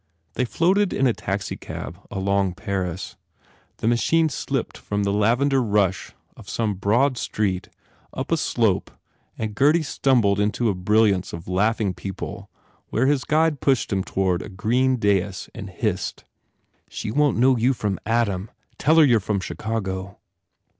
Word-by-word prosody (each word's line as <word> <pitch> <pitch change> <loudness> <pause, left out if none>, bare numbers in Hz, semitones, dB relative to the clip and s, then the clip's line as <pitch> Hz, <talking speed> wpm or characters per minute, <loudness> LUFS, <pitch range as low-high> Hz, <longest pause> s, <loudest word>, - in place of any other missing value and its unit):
They 125 - 0
floated 185 - +2
in 135 - +1
a 125 - +3
taxicab 100 -1 -5
along 95 -1 0
Paris. 95 -3 -4 0.6
The - - -2
machine 160 +7 +3
slipped 130 - -3
from 105 0 -3
the 100 0 0
lavender 125 +6 +2
rush 100 -4 0 0.2
of - - -13
some 110 -3 -1
broad 120 +7 +1
street 95 -4 -2 0.4
up - - -5
a - - +3
slope - - +1 0.5
and 110 -1 -3
Gurdy 150 +8 +3
stumbled 120 -9 +2
into 105 +3 +1
a - - +1
brilliance 100 0 +2
of 85 0 -7
laughing 100 +1 +1
people 100 +2 -7 0.4
where 120 - 0
his 140 -1 +2
guide 155 -1 +2
pushed 130 -6 +1
him 95 -1 0
toward 95 -2 0
a - - -8
green 120 +7 +1
dais 100 -3 0
and 100 -3 -7
hissed, 95 -1 -3 0.7
"She 105 - -5
won 145 0 +2
t - - -2
know 130 +1 +5
you 120 +3 +2
from 105 -6 -2
Adam. 105 -4 0 0.3
Tell 155 +3 +3
her 160 -2 +7
you 120 -4 +5
re - - -2
from 100 +1 -1
Chicago." 95 -1 -4
105 Hz, 155 wpm, -23 LUFS, 95-130 Hz, 0.7 s, her